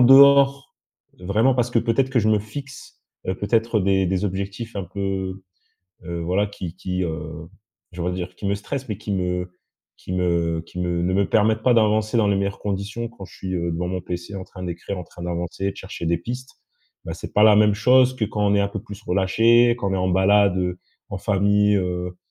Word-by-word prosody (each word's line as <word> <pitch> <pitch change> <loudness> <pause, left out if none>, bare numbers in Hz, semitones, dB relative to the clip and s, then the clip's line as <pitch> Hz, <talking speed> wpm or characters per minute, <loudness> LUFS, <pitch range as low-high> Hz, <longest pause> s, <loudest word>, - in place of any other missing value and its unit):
dehors 140 +1 +6 0.4
de 90 - -15
vraiment 110 +7 +3
parce 120 -1 0
que, 120 - +2
peut-être, 130 +3 +1
que 125 -3 +2
je 110 - +1
me 110 -1 +4
fixe 135 +6 -10 0.3
heu, 95 - 0
peut-être, 115 +2 +1
heu, 100 - -1
des 95 -1 +2
des 95 +2 0
objectifs 100 +4 -4
un 95 - -3
peu, 95 0 -4 0.6
heu 85 -1 -4
voilà 95 +5 0
qui 90 -4 -7
qui 90 0 -3
heu, 80 -1 -5 0.5
je 90 - -6
voudrais 90 +1 -1
dire, 90 0 -5
qui 100 - -8
me 100 - +1
stressent 125 +5 -5
mais 105 - -3
qui 105 -1 -6
me 90 -1 -2 0.5
qui 90 - -7
me 85 -2 0
qui 90 - -9
me 85 -1 -1
ne 90 +1 0
me 100 +1 +2
permettent 110 +1 +2
pas 125 - +4
d'avancer 110 0 +2
dans 105 - +3
les 100 - +2
meilleures 100 0 -2
conditions 105 +3 -3
quand 100 -5 -11
je 95 - -16
suis, 95 -1 -5
heu, 85 0 -1
devant 90 +2 -2
mon 90 0 -3
PC, 90 +3 -6
en 95 - -5
train 90 - -10
d'écrire, 90 +2 -5
en - - -6
train 85 +1 -12
d'avancer 85 +2 -3
et - - 0
de - - -18
chercher 95 -3 -7
des 85 -1 +2
pistes. 125 +6 -6 0.5
Bah - - -4
c'est - - -9
pas 105 - +5
la 110 -1 +7
même 105 -1 +5
chose 130 +4 +4
que 115 - 0
quand 105 -1 -1
on 100 - +3
est - - +3
un 100 - +1
peu 105 -1 -5
plus 100 -2 -10
relâché, 115 +6 +4
quand 100 -5 -2
on - - 0
est - - 0
en 95 0 0
balade, 95 +1 +4
heu, 90 0 -2 0.3
en 100 - -4
famille, 105 +1 +2
heu 90 -1 -3
100 Hz, 230 wpm, -22 LUFS, 90-110 Hz, 0.6 s, la